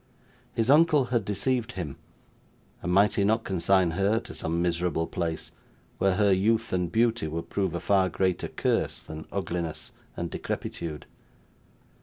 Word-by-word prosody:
His 115 +3 +2
uncle 150 -2 +5
had 115 -3 +2
deceived 115 +4 -1
him, 85 -7 -5 0.9
and 90 - -2
might 100 +3 +5
he 100 - +1
not 110 +3 +2
consign 95 -1 +2
her 100 +6 +2
to - - -9
some 80 +1 -2
miserable 85 -1 0
place 80 -1 -3 0.5
where 95 -1 +3
her 100 -1 +4
youth 110 +4 +1
and 90 -2 0
beauty 115 -4 +2
would 80 +2 -5
prove 95 -3 0
a - - -1
far 95 -1 +3
greater 90 0 0
curse - - -1
than 80 0 -8
ugliness 85 -4 -3 0.3
and 85 -1 -3
decrepitude? 75 -3 -4
95 Hz, 150 wpm, -27 LUFS, 85-110 Hz, 0.9 s, uncle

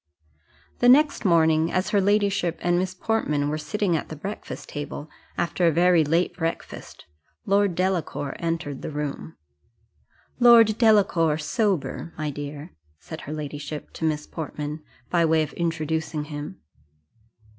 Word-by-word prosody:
The 245 - +5
next 285 -1 +4
morning, 160 -2 +3
as 185 +1 0
her 205 - +3
ladyship 200 -3 +1
and 175 0 +2
Miss 185 0 -2
Portman 150 -9 0
were 155 +1 -2
sitting 195 +2 -1
at 155 - -3
the 155 - -6
breakfast 195 +8 -7
table, 145 +1 -6 0.3
after 175 0 +1
a - - +5
very 175 +1 +4
late 165 +4 +1
breakfast, 165 -1 -5 0.4
Lord 200 -3 +2
Delacour 180 -6 -1
entered 165 -4 -3
the - - -5
room. 150 +1 -5 1.0
"Lord 230 -3 +6
Delacour, 195 -9 +4
sober, 170 - -1
my 155 -1 -2
dear," 145 +3 -7 0.3
said 160 - -9
her 145 - -8
ladyship 150 0 -6
to - - -8
Miss 150 -2 0
Portman, 150 -1 -6 0.3
by 170 -1 +3
way 160 -1 +3
of 150 - -7
introducing 160 -2 -2
him. 150 +5 -7
165 Hz, 140 wpm, -24 LUFS, 150-190 Hz, 1.0 s, Lord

